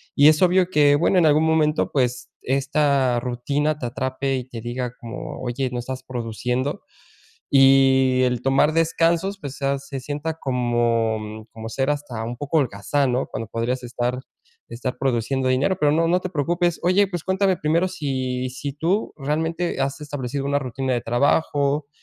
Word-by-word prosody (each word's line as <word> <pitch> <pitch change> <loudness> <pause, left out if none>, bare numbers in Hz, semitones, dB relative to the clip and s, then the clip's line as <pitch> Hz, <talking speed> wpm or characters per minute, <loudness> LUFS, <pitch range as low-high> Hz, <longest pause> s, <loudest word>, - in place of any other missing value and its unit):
Y 145 +1 +6
es 155 -1 +3
obvio 180 0 +4
que 145 -4 +4
bueno, 175 +5 +2
en 170 - +4
algún 155 +1 +4
momento, 155 -1 +2
pues, 125 -2 -1
esta 135 -1 +1
rutina 140 +5 -1
te 125 - -3
atrape 130 +2 -2
y 125 - -6
te 115 -2 -7
diga 120 +1 -4
como: 120 +1 -7
"Oye, 130 +1 -2
no 125 - -3
estás 130 +1 -6
produciendo". 125 +2 -3 0.7
Y 135 -1 +5
el 125 -1 0
tomar 135 +4 +3
descansos, 165 +4 +1
pues, 140 -1 -7
sea 140 0 0
se 140 0 -7
sienta 150 +4 -4
como 115 -4 -1
como 110 0 -8
ser 135 +4 -1
hasta 140 -6 -4
un 120 +1 -5
poco 145 +3 -1
holgazán, 125 +3 0
¿no?, 125 - 0
cuando 115 - -5
podrías 120 +4 -2
estar 125 +1 -2 0.5
estar 125 +2 -4
produciendo 130 0 0
dinero. 140 +8 +1
Pero 150 -1 +3
no, 165 +2 +2
no 180 +2 +3
te 185 - -4
preocupes. 175 +2 0
Oye, 185 +3 +4
pues 175 -4 -5
cuéntame 190 0 +1
primero 165 +5 +1
si 130 -6 -3
si 140 +2 -5
tú 175 +8 -1
realmente 160 +4 -2
has 140 +2 -2
establecido 140 -2 -4
una 140 0 +1
rutina 130 0 -3
de 120 - -1
trabajo, 140 +3 +1
135 Hz, 170 wpm, -22 LUFS, 125-150 Hz, 0.7 s, Y